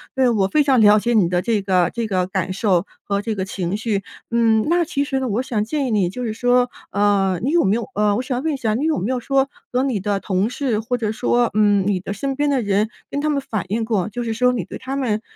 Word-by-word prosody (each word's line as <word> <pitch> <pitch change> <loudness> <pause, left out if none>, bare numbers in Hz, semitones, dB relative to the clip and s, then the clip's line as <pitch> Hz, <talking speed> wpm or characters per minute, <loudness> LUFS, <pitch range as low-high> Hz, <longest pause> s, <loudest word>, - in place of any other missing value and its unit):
对， 260 -2 +3
我 205 -5 +2
非 300 +9 +2
常 270 -3 +3
了 210 0 +6
解 240 +3 0
你 205 -6 +4
的 180 0 +1
这 220 0 0
个 185 -3 +2
这 235 -1 -2
个 185 -3 0
感 185 -1 -2
受 190 -3 +1 0.2
和 200 0 -1
这 220 +1 -2
个 190 -2 -2
情 185 -1 -3
绪， 215 -3 -2 0.3
嗯， 225 -2 +3
那 345 +1 +3
其 280 -2 -1
实 275 -2 -2
呢， 260 - -2
我 225 +2 0
想 230 -5 -1
建 285 +5 -2
议 - - -2
你 200 -5 +2
就 250 +7 -6
是 225 -2 -2
说， 245 +2 +2 0.2
呃， 195 -3 +2
你 260 - +1
有 340 +1 +3
没 195 - +2
有， 235 - -3
呃 210 0 +2
我 245 - 0
想 255 -1 -3
问 320 -1 0
一 - - -3
下 225 -5 -1
你 255 +7 -1
有 315 -2 +1
没 205 +8 -2
有 255 - -1
说 270 +2 +1 0.2
和 250 +1 +1
你 260 -6 0
的 200 +1 -1
同 195 +1 0
事 250 -4 -1
或 245 +3 -2
者 220 -3 -1
说， 240 +1 +1
嗯， 205 -2 +3
你 200 -3 +1
的 195 +2 -5
身 270 +6 -3
边 290 +1 +1
的 275 -3 +1
人 205 0 +1 0.2
跟 285 - -3
他 305 - 0
们 285 -2 0
反 220 -8 -4
映 225 +3 -1
过， 215 -3 0
就 240 +4 -4
是 225 -1 -2
说 250 +3 +3
你 245 - -2
对 - - -8
他 265 +1 -5
们 230 -6 -1
225 Hz, 295 characters per minute, -21 LUFS, 200-255 Hz, 0.3 s, 了